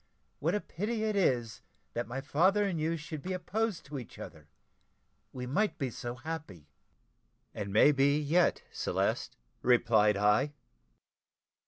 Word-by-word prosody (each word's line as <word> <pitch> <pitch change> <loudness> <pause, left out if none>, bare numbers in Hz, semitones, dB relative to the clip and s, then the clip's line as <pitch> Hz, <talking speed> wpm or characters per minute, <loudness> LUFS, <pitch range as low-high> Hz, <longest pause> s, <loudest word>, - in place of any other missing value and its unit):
What 165 +6 +1
a - - +1
pity 215 +4 -3
it 215 -1 0
is 120 - +1 0.3
that 120 - -2
my 130 +3 -4
father 185 +9 +3
and 180 -5 -1
you 165 +2 0
should 150 0 -7
be 185 +4 -3
opposed 200 +2 -2
to 140 0 -5
each 120 - -11
other - - -10 0.8
we 125 -1 -5
might 205 +12 0
be 135 -4 -2
so 120 +1 -5
happy!" 130 - -7 0.8
"And 100 -1 -5
may 110 +8 +6
be 140 +1 +3
yet, 160 +4 +2
Celeste," - - -1 0.3
replied 110 -4 +4
I. 105 +8 +3
145 Hz, 145 wpm, -31 LUFS, 120-180 Hz, 0.8 s, may